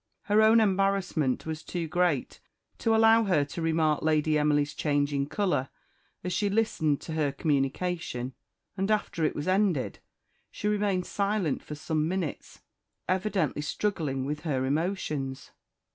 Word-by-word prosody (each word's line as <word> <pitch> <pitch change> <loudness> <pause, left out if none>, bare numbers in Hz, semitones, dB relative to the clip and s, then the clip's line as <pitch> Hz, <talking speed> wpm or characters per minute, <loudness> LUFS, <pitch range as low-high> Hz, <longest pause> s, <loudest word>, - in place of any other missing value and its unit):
Her 210 +1 +3
own 220 +1 +6
embarrassment 195 - +1
was 160 -1 -4
too 170 -1 -4
great 175 -5 0 0.4
to 225 -1 +2
allow 225 0 +5
her 170 -7 +2
to 145 +4 -6
remark 160 -2 +1
Lady 155 0 +2
Emily's 150 -1 +2
changing 145 -1 0
colour, 180 -10 0 0.5
as 180 0 -2
she 200 +4 +1
listened 195 -9 +1
to 160 - -6
her 150 -3 +1
communication; 140 -2 -1 0.4
and 195 +1 -1
after 210 -6 0
it - - 0
was 145 - -4
ended 185 -7 +1 0.5
she 210 - -4
remained 200 -3 +1
silent 200 -6 -1
for 150 - -7
some 155 +1 -1
minutes, 175 -4 -4 0.5
evidently 185 -5 0
struggling 150 -5 -2
with 150 +2 -3
her 140 -5 -1
emotions. 145 -3 -2
160 Hz, 140 wpm, -28 LUFS, 145-195 Hz, 0.5 s, own